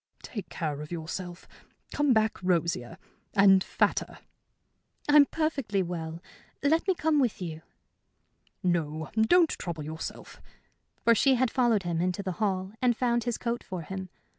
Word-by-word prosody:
"Take 210 -5 -7
care 150 -4 -3
of 150 - -9
yourself. 175 +2 -6 0.5
Come 290 -2 +2
back 220 -4 +2
rosier 170 -8 0 0.4
and 195 -2 +6
fatter." - - 0 0.9
"I'm 290 -1 +7
perfectly 275 -11 -1
well. 165 -1 -5 0.4
Let 320 +6 +2
me 380 - +3
come 315 -3 +2
with 250 -5 +1
you." 160 -3 -5 1.0
"No, 160 -3 -1
don't 320 +10 +4
trouble 165 -3 -5
yourself." 160 +2 -7 0.6
For 235 - +6
she 265 +4 +4
had 255 -1 +1
followed 235 -6 +2
him 170 -1 -1
into 185 +2 -1
the 190 - -2
hall 190 -2 0
and 245 -2 +3
found 240 -2 +1
his 240 -2 -1
coat 235 0 -3
for 180 -3 -6
him. 190 +3 -6
195 Hz, 145 wpm, -28 LUFS, 170-245 Hz, 1.0 s, I'm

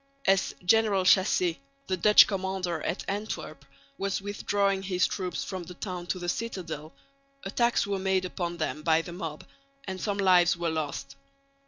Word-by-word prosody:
As 195 0 +2
General 205 -1 +4
Chassé, 215 - +3 0.3
the 185 - -1
Dutch 210 +4 +7
commander 190 -4 -2
at - - -3
Antwerp, 205 +2 -4 0.4
was 195 0 -1
withdrawing 200 -1 0
his 185 -2 +1
troops 185 -3 -3
from 185 -2 -5
the 175 +1 -10
town 180 -2 -5
to 185 - -1
the 175 -1 -5
citadel, 175 -7 -4 0.5
attacks 235 +4 +1
were 200 -1 -2
made 190 -1 +1
upon 175 -1 -4
them 155 -2 -3
by 160 +1 +3
the 175 - -8
mob, 165 -4 -6 0.4
and 190 -4 -6
some 205 -2 -1
lives 180 -3 +4
were 170 -1 -1
lost. 145 -3 -4
185 Hz, 160 wpm, -28 LUFS, 175-200 Hz, 0.5 s, Dutch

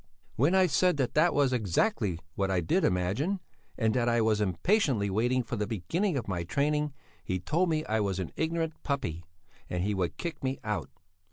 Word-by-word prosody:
When 145 +10 +3
I 190 -1 +6
said 180 +1 +2
that 130 -3 0
that 165 +3 +4
was 140 -3 +2
exactly 105 - +1 0.2
what 95 +1 -1
I 95 -2 +2
did 80 - +1
imagine, 100 - +1 0.4
and 110 -3 +2
that 120 -1 +2
I 120 0 +2
was 110 -1 +2
impatiently 105 - +1
waiting 120 +5 +1
for 120 +1 -4
the 105 0 -1
beginning 155 - -1
of 125 - -3
my 90 -3 -2
training, 150 - 0 0.3
he 95 - -2
told 165 - +1
me 155 -1 0
I 110 +1 0
was 100 -3 0
an 95 -3 -4
ignorant 160 0 -2
puppy, 135 - -2 0.5
and 90 0 -1
he 105 +2 0
would 90 -3 -2
kick 170 -4 -5
me 130 0 -1
out. 105 -9 -2
120 Hz, 195 wpm, -29 LUFS, 95-155 Hz, 0.5 s, I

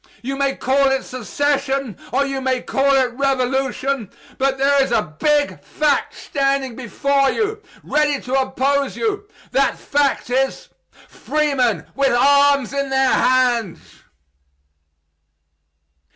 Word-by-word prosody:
You 270 +3 -3
may 275 0 0
call 275 +1 +2
it 270 0 0
secession, 275 -1 -2 0.2
or 275 +3 +1
you 275 -1 -3
may 260 -1 -1
call 275 +1 +2
it 255 -2 +1
revolution; 265 -2 -1 0.3
but 270 0 +1
there 275 +1 +3
is 270 - 0
a 155 -9 -1
big 295 -1 +1
fact 295 -2 0
standing 275 -3 -1
before 275 +3 0
you, 430 - -2 0.2
ready 295 -2 +1
to 250 - -6
oppose 270 +1 0
you 415 -2 -2 0.2
that 275 0 +1
fact 280 -3 -1
is, 265 +1 -1 0.4
freemen 260 - -1
with 275 -2 +1
arms 280 0 +3
in 280 -1 -2
their 265 -1 +2
hands. 245 -7 +2
275 Hz, 125 wpm, -20 LUFS, 260-280 Hz, 0.4 s, there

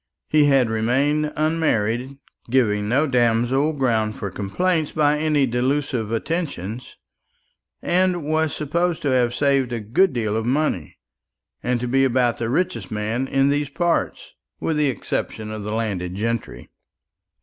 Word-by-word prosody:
He 150 -1 +4
had 135 -4 +4
remained 135 +7 +1
unmarried, 135 -5 0 0.3
giving 105 -5 +1
no 135 +6 +3
damsel 125 +2 +2
ground 115 -6 0
for 100 - -5
complaint 155 - -1
by 150 -1 +3
any 150 -3 +2
delusive 125 -2 -1
attentions, 120 - -4 0.9
and 180 -2 +1
was 155 0 +1
supposed 170 +4 -1
to 145 - +1
have 120 -2 +2
saved 135 -2 +1
a 120 - -2
good 125 - +2
deal 110 -4 -1
of 110 +1 -1
money, 130 - -1 0.6
and 125 0 0
to 125 - -2
be 135 +2 +2
about 125 -2 +2
the 115 - -2
richest 120 - -1
man 110 +5 -2
in 135 +1 +2
those 145 0 0
parts, 170 +4 -1 0.3
with 160 - -1
the 150 -2 +2
exception 110 -2 -4
of 110 0 -5
the 105 +1 -5
landed 100 -5 -2
gentry. 105 - -4
130 Hz, 145 wpm, -22 LUFS, 110-150 Hz, 0.9 s, He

